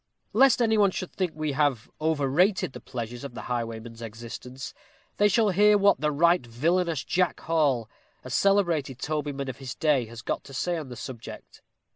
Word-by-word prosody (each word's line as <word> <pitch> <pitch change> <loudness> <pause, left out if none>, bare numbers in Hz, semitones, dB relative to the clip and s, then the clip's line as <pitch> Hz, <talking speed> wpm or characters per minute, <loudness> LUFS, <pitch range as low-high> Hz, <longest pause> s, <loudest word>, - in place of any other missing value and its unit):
Lest 255 +2 +5
any 220 -1 +3
one 200 -1 +5
should 185 -1 -5
think 185 -4 -2
we 155 -1 -2
have 140 -5 +1
overrated 160 +3 +2
the - - -8
pleasures 120 -1 -6
of 135 -3 -7
the - - -5
highwayman's 115 -1 -4
existence, 120 +4 -8 0.4
they 205 - +5
shall 210 +1 +3
hear 210 +3 +5
what 200 -3 +3
"the 150 - +2
right 170 +2 +3
villainous" 160 +6 0
Jack 180 0 0
Hall, 145 -8 +1 0.4
a 130 - -8
celebrated 170 -8 +2
tobyman 145 -1 -3
of 130 -1 -5
his 135 -2 -7
day, 145 -6 +2
has 115 +1 -10
got - - -2
to 135 - -10
say 175 +4 -1
on 155 -5 -5
the 125 - -7
subject. 120 -2 -9
145 Hz, 180 wpm, -27 LUFS, 125-180 Hz, 0.4 s, Lest